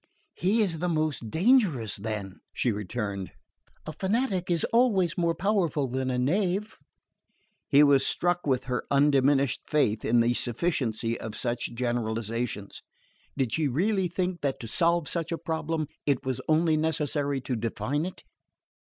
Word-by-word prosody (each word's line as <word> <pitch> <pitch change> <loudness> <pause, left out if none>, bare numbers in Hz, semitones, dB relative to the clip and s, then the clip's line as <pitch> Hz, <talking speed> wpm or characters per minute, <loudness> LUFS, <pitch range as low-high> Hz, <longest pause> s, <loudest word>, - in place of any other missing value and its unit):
"He 210 +6 +2
is 170 -6 -1
the 180 +2 -1
most 155 -8 -1
dangerous, 165 - +2
then," 100 -2 -5 0.2
she 125 - +1
returned. 100 -2 -4 0.5
"A 155 - -6
fanatic 195 -2 -1
is 170 -2 +2
always 205 -9 +3
more 170 -1 +1
powerful 170 -6 +1
than 130 +1 -2
a 125 - -1
knave." 185 +9 0 0.9
He 145 0 +7
was 140 -2 +5
struck 175 -2 0
with 130 -2 +1
her 125 -2 -2
undiminished 140 -1 +3
faith 115 -8 +1
in 120 +1 +3
the 120 +1 +2
sufficiency 120 -4 -1
of 110 -1 -6
such 120 -1 -2
generalisations. 115 -3 -3 0.6
Did 130 -5 0
she 155 -2 +1
really 190 - +1
think 180 0 -2
that 140 -2 -1
to 115 - -6
solve 170 +5 +2
such 170 -1 -2
a 165 - -1
problem 160 -1 -2 0.2
it 140 -3 +1
was 130 -2 -2
only 160 0 +3
necessary 145 -3 0
to 125 0 -3
define 115 +6 -2
it? 185 - -10
145 Hz, 150 wpm, -27 LUFS, 120-170 Hz, 0.9 s, He